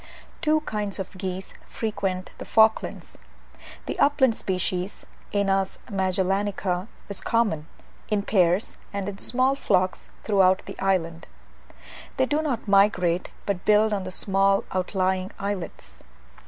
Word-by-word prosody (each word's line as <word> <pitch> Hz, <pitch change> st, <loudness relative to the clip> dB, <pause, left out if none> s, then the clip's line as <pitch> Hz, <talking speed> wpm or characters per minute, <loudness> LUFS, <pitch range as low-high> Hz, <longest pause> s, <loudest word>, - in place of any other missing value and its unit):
Two 310 Hz, -2 st, +3 dB
kinds 210 Hz, -8 st, -3 dB
of 190 Hz, 0 st, -6 dB
geese 185 Hz, 0 st, -4 dB
frequent 195 Hz, -4 st, -3 dB
the -, -, -6 dB
Falklands. 220 Hz, 0 st, +3 dB, 0.7 s
The -, -, -4 dB
upland 265 Hz, -5 st, +4 dB
species 185 Hz, 0 st, -2 dB, 0.3 s
(Anas 195 Hz, -1 st, +1 dB
Magellanica) 190 Hz, 0 st, 0 dB, 0.2 s
is 200 Hz, -, -4 dB
common, 205 Hz, -10 st, +1 dB, 0.4 s
in 210 Hz, -2 st, +1 dB
pairs 185 Hz, -1 st, +2 dB
and 200 Hz, -1 st, -3 dB
in 200 Hz, -1 st, -5 dB
small 255 Hz, +2 st, +2 dB
flocks, 185 Hz, -8 st, 0 dB
throughout 190 Hz, -3 st, +3 dB
the 195 Hz, -, -9 dB
island. 170 Hz, -4 st, 0 dB, 0.9 s
They 260 Hz, -, +4 dB
do 295 Hz, +3 st, +1 dB
not 275 Hz, -8 st, -2 dB
migrate, 190 Hz, -3 st, +3 dB, 0.2 s
but 195 Hz, -3 st, -2 dB
build 215 Hz, +1 st, +4 dB
on 195 Hz, -2 st, -1 dB
the 185 Hz, -, -5 dB
small 195 Hz, +1 st, +2 dB
outlying 185 Hz, 0 st, 0 dB
islets. 200 Hz, -3 st, -5 dB
195 Hz, 125 wpm, -25 LUFS, 185-210 Hz, 0.9 s, upland